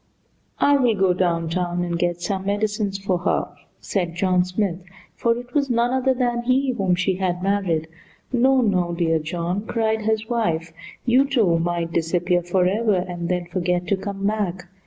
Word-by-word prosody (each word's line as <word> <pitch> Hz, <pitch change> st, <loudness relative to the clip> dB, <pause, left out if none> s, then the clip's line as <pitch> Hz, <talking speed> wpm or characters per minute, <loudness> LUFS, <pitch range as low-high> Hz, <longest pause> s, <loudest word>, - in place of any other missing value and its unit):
"I 285 Hz, 0 st, +4 dB
will 245 Hz, -5 st, +2 dB
go 190 Hz, -2 st, +3 dB
downtown 175 Hz, 0 st, 0 dB
and 170 Hz, -1 st, -2 dB
get 175 Hz, 0 st, -1 dB
some 195 Hz, -1 st, -2 dB
medicine 205 Hz, 0 st, 0 dB
for 195 Hz, -2 st, -1 dB
her," 175 Hz, -, 0 dB, 0.3 s
said 175 Hz, -4 st, -2 dB
John 180 Hz, 0 st, +2 dB
Smith 180 Hz, -1 st, -2 dB, 0.4 s
(for 235 Hz, 0 st, +1 dB
it 245 Hz, 0 st, -9 dB
was 285 Hz, -2 st, +1 dB
none 240 Hz, 0 st, +2 dB
other 260 Hz, 0 st, +2 dB
than 240 Hz, -1 st, 0 dB
he 255 Hz, +2 st, +2 dB
whom 195 Hz, -7 st, +1 dB
she 185 Hz, +1 st, 0 dB
had 180 Hz, -1 st, -1 dB
married). 190 Hz, -5 st, 0 dB, 0.5 s
"No, 260 Hz, +2 st, +4 dB
no, 180 Hz, -6 st, +1 dB
dear 165 Hz, -2 st, +1 dB
John," 170 Hz, +5 st, -3 dB
cried 220 Hz, -1 st, 0 dB
his 220 Hz, 0 st, 0 dB
wife. 165 Hz, -9 st, -1 dB, 0.3 s
"You, 255 Hz, +3 st, +4 dB
too, 205 Hz, -12 st, +3 dB
might 170 Hz, 0 st, -1 dB
disappear 175 Hz, +2 st, +1 dB
forever, 190 Hz, +5 st, +1 dB
and 175 Hz, -1 st, -3 dB
then 180 Hz, -1 st, -1 dB
forget 180 Hz, 0 st, -1 dB
to 200 Hz, -, +3 dB
come 195 Hz, 0 st, -5 dB
back." 190 Hz, -4 st, -2 dB
190 Hz, 170 wpm, -22 LUFS, 175-220 Hz, 0.5 s, I